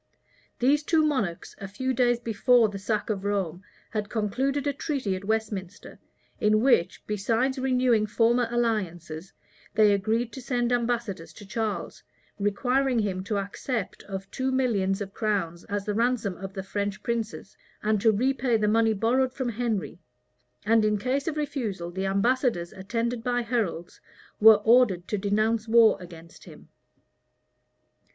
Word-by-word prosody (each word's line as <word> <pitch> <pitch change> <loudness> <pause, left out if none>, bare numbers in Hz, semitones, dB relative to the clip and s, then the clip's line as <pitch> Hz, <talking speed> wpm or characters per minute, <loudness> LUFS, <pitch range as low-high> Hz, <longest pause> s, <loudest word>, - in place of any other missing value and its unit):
These 280 +4 +3
two 315 0 +2
monarchs, 215 - -2
a 195 - -6
few 260 +7 -2
days 240 -1 +2
before 235 0 +3
the 200 -1 -6
sack 210 +2 -1
of 195 -2 -3
Rome, 190 -4 -2 0.3
had 210 -2 -3
concluded 255 +7 -1
a 285 - 0
treaty[*] 270 - -2
at 185 +1 -7
Westminster, 210 -3 -3 0.4
in 215 0 +3
which, 195 -9 +2
besides 230 +6 0
renewing 250 -4 +2
former 235 +2 +2
alliances, 190 -8 -2 0.4
they 215 -1 +5
agreed 220 +4 0
to 265 - -7
send 245 -1 -1
ambassadors 230 -9 -2
to 205 - -12
Charles, 215 +1 -3 0.4
requiring 250 +6 +1
him 195 -4 -1
to 210 -1 -1
accept 200 +2 -4
of 195 -1 -7
two 265 0 -1
millions 210 -7 +1
of 195 -1 -5
crowns 190 -6 -2
as 200 -1 -3
the 210 - -1
ransom 230 -3 0
of 195 +1 -8
the 190 - -4
French 200 +1 -3
princes, 225 -4 -4 0.3
and 215 -1 +1
to 225 - +5
repay 250 +2 +1
the 210 -1 0
money 225 +1 +3
borrowed 250 +5 +1
from 260 -3 -2
Henry; 225 -6 -2 0.7
and 225 +1 +4
in 210 0 +2
case 260 +7 -1
of 310 -1 -2
refusal, 220 - -3
the 190 +2 -2
ambassadors, 200 -2 +1
attended 230 +4 -3
by 245 0 0
heralds, 225 -8 -3 0.4
were 220 0 +9
ordered 225 -7 +4
to 210 - -2
denounce 215 +3 0
war 225 -1 +6
against 170 -2 -13
him. - - -14
220 Hz, 150 wpm, -26 LUFS, 200-245 Hz, 0.7 s, were